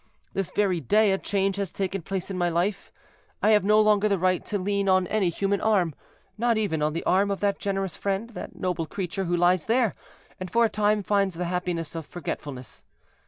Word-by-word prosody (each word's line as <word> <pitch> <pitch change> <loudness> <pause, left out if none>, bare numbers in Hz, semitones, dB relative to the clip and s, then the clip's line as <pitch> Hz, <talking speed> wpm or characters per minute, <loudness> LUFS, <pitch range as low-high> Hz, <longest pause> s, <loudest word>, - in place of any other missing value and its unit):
This 195 -2 -2
very 190 -2 +1
day 210 - +3
a 190 - +1
change 195 -1 0
has 200 -4 -2
taken 195 -1 -3
place 190 +2 -4
in 190 - -4
my 175 0 +2
life; 180 +4 -1 0.5
I 215 - +5
have 210 -2 +5
no 210 +2 +4
longer 215 -1 +4
the 200 - +2
right 185 0 +1
to 210 - -2
lean 200 +1 0
on 185 -1 +4
any 195 -1 +1
human 200 +3 -1
arm—not 215 - -1
even 195 -8 0
on 150 0 +1
the 165 - -3
arm 195 +2 +2
of 200 - -2
that 200 -1 +1
generous 195 -2 -2
friend, 200 +4 -2
that - - -8
noble 175 -3 -2
creature, 190 0 -3
who 175 0 0
lies 175 -1 +2
there, 230 -2 +2 0.5
and 185 -1 -5
for 235 +3 +3
a - - +1
time 210 0 +1
finds 195 -2 +1
the 175 +1 -3
happiness 175 -2 -2
of 165 -3 -6
forgetfulness. 145 -6 -7
195 Hz, 210 wpm, -26 LUFS, 175-205 Hz, 0.5 s, I